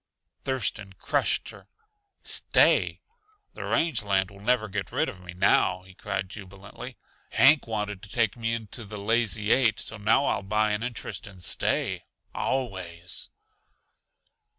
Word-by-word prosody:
Thurston 105 -6 -2
crushed - - 0
her - - -13
close. 450 -1 -40 0.5
"Stay? - - +3 0.5
The - - -7
range 165 -6 +1
land 95 -2 +1
will 100 - -14
never 110 +1 +2
get 100 -1 -4
rid - - +1
of 90 - -7
me 90 -1 -10
now," 90 0 +3
he 95 0 -15
cried 95 -1 -3
jubilantly. 100 -1 -10 0.4
"Hank 145 0 +6
wanted 105 -3 -3
to 105 - -11
take 115 0 +1
me 115 -1 -1
into 115 +1 -6
the 105 0 -8
Lazy 105 0 +1
Eight, 120 -4 +4
so 110 - -1
now 110 +7 +3
I'll - - +1
buy 105 +2 +1
an 105 +1 -1
interest, 115 -3 -4
and 95 -3 -12
stay - - 0 0.3
always." 95 -9 -3
105 Hz, 150 wpm, -27 LUFS, 95-115 Hz, 0.5 s, Hank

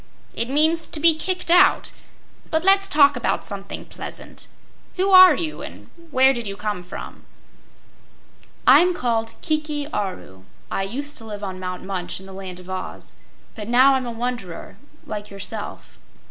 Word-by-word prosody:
"It 235 - -3
means 315 +4 +2
to 310 - -2
be 330 +1 +6
kicked 360 +2 -3
out. 360 +2 +5 0.6
But 320 0 0
let's 390 +1 +4
talk 285 -3 +5
about 245 - -1
something 200 -1 -7
pleasant. - - -10 0.5
Who 385 +1 +1
are 370 -4 +9
you 320 -3 -4
and - - -11 0.2
where 265 -1 +4
did 235 -4 -5
you 195 0 -6
come 210 -3 -3
from?" 180 +1 -9 1.4
"I'm 360 +1 +6
called 225 -5 -1
Kiki 305 -2 -1
Aru. 140 - -5 0.3
I - - -1
used 275 +9 -4
to 225 - -8
live 210 -1 -7
on 190 -2 -5
Mount 185 -1 -5
Munch 185 -2 -4
in 190 - -13
the 190 - -11
Land 190 -2 -7
of 180 - -13
Oz, 185 0 -7 0.4
but 210 -4 -8
now 255 +3 +5
I'm 260 -2 -1
a - - -3
wanderer 230 -7 -5 0.3
like 210 -1 -6
yourself." 200 +2 -7
235 Hz, 160 wpm, -22 LUFS, 195-310 Hz, 1.4 s, are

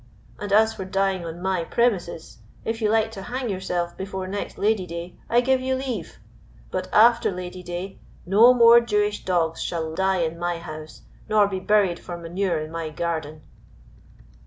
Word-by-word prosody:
And 205 -1 -5
as 220 +2 +4
for 190 - -6
dying 195 -1 0
on 170 +2 -7
my 190 -2 0
premises, 180 -6 -1 0.3
if 225 +1 -3
you 215 - +2
like 220 0 +2
to 195 - -8
hang 245 +4 -4
yourself 180 -3 -2
before 190 -1 -5
next 200 +2 -5
Lady 205 -3 +1
day, 170 +1 -7
I 240 +1 +4
give 260 +1 +2
you 260 0 0
leave, 255 -10 -5 0.5
but - - -3
after 230 +2 +5
Lady 180 0 -6
day 180 +2 -6 0.3
no 215 +7 +7
more 235 -1 +7
Jewish 210 -2 0
dogs 170 -3 0
shall 160 -2 -3
die 190 +1 +1
in 165 +1 -3
my 175 0 -1
house 155 -2 -9 0.3
nor 210 -1 +4
be 190 -2 -3
buried 195 -3 +2
for 175 - -7
manure 170 0 -2
in 155 +1 -6
my 165 -1 -4
garden." 155 -1 -4
190 Hz, 175 wpm, -24 LUFS, 170-215 Hz, 0.5 s, no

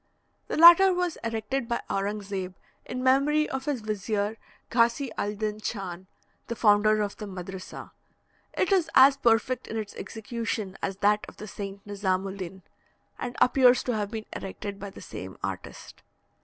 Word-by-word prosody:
The - - -3
latter 345 +4 +9
was 355 -2 -1
erected 230 +3 -2
by 235 - -2
Aurang 205 +1 -2
Zeb, 190 -2 -5 0.3
in 255 0 -4
memory 280 +4 +3
of 265 0 -4
his 280 -5 -1
vizier 210 0 -2 0.4
Ghasy 235 +3 +2
al 205 +1 -2
dyn 215 0 -3
Chan, 190 -4 -5 0.4
the 235 - -3
founder 215 -1 +4
of 205 - -5
the 210 - -6
madrissa. 185 0 -8 0.6
It 375 - 0
is 360 -4 +3
as 270 +1 +8
perfect 240 0 +1
in 225 - -4
its 215 -2 -4
execution 220 -3 -4
as 190 -1 -3
that 210 +1 +3
of - - -16
the 215 - -8
saint 200 -1 -7
Nizam 195 -2 -1
ul 195 0 -5
din, 190 0 -7 0.6
and 245 -1 -5
appears 250 0 +5
to 245 - -1
have 205 -2 -2
been 220 -1 -5
erected 200 +1 -6
by 200 0 -6
the - - -12
same 95 +1 -8
artist. 95 -2 -7
215 Hz, 170 wpm, -27 LUFS, 200-250 Hz, 0.6 s, latter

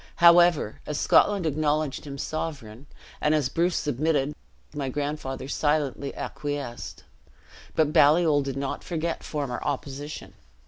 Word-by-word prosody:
However, 170 -7 +5
as 150 -1 -2
Scotland 200 -4 +4
acknowledged 155 -1 0
him 140 -1 -6
sovereign, 140 -5 -5 0.3
and 150 +1 +3
as 145 -4 +1
Bruce 170 +4 +1
submitted, 145 0 0 0.4
my 140 -3 -3
grandfather 145 -1 -4
silently 145 -1 0
acquiesced. 140 -5 -5 0.7
But 155 -1 +2
Baliol 155 -1 +5
did 135 -1 -4
not 135 0 -3
forget 165 -1 -3
former 140 -5 -3
opposition. 145 +2 -5
145 Hz, 120 wpm, -26 LUFS, 140-155 Hz, 0.7 s, However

